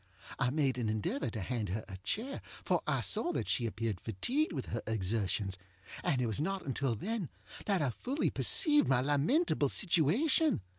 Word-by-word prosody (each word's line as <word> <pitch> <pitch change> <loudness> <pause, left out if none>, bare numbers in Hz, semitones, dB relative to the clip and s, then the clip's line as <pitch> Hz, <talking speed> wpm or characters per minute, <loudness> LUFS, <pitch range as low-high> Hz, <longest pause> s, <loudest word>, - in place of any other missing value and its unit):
I 125 - +2
made 135 -2 0
an 115 -3 -1
endeavor 110 +5 -2
to 110 -1 -5
hand 110 -1 -3
her 105 +4 -3
a 95 - -8
chair, 225 - -3 0.2
for - - +1
I - - +1
saw 350 - 0
that - - -2
she 120 - +1
appeared 110 -4 -3
fatigued 245 - -1
with 135 -6 -4
her 115 - -2
exertionsŌĆöand 100 - -2
it - - +1
was 115 +4 -1
not 195 +3 -2
until 135 -2 -1
then 205 - -3 0.4
that 195 -6 +2
I 135 - 0
fully 265 - -2
perceived 295 -4 +5
my 130 -2 +3
lamentable 145 - +2
situation. 205 - +3
130 Hz, 170 wpm, -32 LUFS, -, 0.4 s, perceived